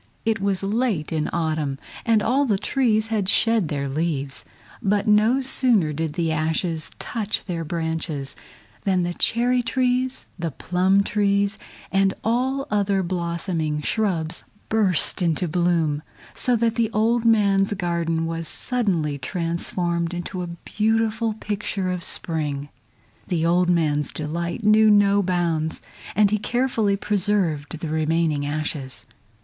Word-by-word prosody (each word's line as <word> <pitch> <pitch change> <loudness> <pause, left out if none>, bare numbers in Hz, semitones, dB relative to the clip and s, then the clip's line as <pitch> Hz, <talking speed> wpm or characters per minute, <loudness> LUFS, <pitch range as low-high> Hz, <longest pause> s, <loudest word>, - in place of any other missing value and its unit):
It 225 -3 +1
was 195 -1 0
late 210 -6 0
in 155 -2 -1
autumn 155 -4 -1 0.3
and 220 -2 +4
all 270 +5 +2
the 210 -6 +1
trees 220 -1 +1
had 200 -3 +1
shed 225 -5 +3
their 140 -2 -2
leaves, 140 -1 -2 0.4
but 205 +2 +1
no 215 +5 +4
sooner 240 - +3
did 160 0 -2
the 165 -1 0
ashes 160 +1 -1
touch 215 -3 -3
their 170 -4 -3
branches 160 -3 -3 0.5
than 185 -2 +2
the 175 0 -2
cherry 245 +6 +2
trees, 255 +1 0
the 170 -1 -1
plum 185 +6 +2
trees, 200 0 +1 0.3
and 195 0 +2
all 260 +5 0
other 200 -2 +1
blossoming 170 -3 -2
shrubs 175 -6 -1 0.3
burst 200 -5 +2
into 175 +1 +1
bloom, 165 -3 +1 0.3
so 250 - +1
that 230 -1 +1
the 230 -2 +1
old 225 +2 +1
man's 200 -4 +3
garden 170 -3 -1
was 165 0 -3
suddenly 175 - -1
transformed 170 +3 -2
into 175 +1 -4
a 175 - -4
beautiful 220 +5 0
picture 200 -3 -3
of 180 -1 -4
spring. 145 -6 -1 0.6
The 165 -3 0
old 175 +1 +3
man's 150 -4 +1
delight 170 +7 -4
knew 215 +1 +6
no 205 -1 +5
bounds, 170 -4 -1 0.4
and 205 0 +4
he 215 - +1
carefully 230 -4 +1
preserved 185 -7 0
the 160 0 -5
remaining 155 -2 0
ashes. 145 -3 -3
180 Hz, 135 wpm, -23 LUFS, 160-215 Hz, 0.6 s, knew